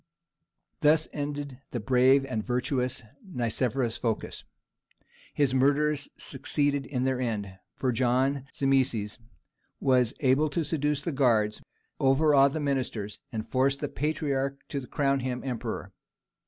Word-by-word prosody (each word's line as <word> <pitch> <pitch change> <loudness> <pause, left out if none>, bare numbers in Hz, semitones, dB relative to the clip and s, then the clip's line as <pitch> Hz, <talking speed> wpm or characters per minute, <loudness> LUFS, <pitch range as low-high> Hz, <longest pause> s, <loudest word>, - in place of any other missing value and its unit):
Thus 155 +1 +4
ended 145 -2 -4
the 120 - -3
brave 130 +3 +4
and 120 -5 -3
virtuous 125 +1 -1 0.2
Nicephorus 125 - -1
Phocas. 115 -3 -3 0.9
His 140 -3 +1
murderers 145 +2 +2
succeeded 145 0 -1
in 130 -3 -2
their 130 -1 0
end, 100 -6 -3 0.2
for 130 - 0
John 130 +3 +1
Zimisces 130 -7 0 0.6
was 125 -2 +2
able 140 +3 +3
to 165 +3 -1
seduce 150 -1 -1
the 170 - -2
guards, 115 -6 +2 0.4
overawe 140 +1 +5
the 140 +3 -3
ministers, 130 -8 -2
and 110 -1 -4
force 135 +3 +2
the 145 0 -4
patriarch 140 -2 -2
to 135 -3 -4
crown 140 -1 +1
him 125 -1 -3
emperor. 125 -4 -4
135 Hz, 125 wpm, -28 LUFS, 125-145 Hz, 0.9 s, overawe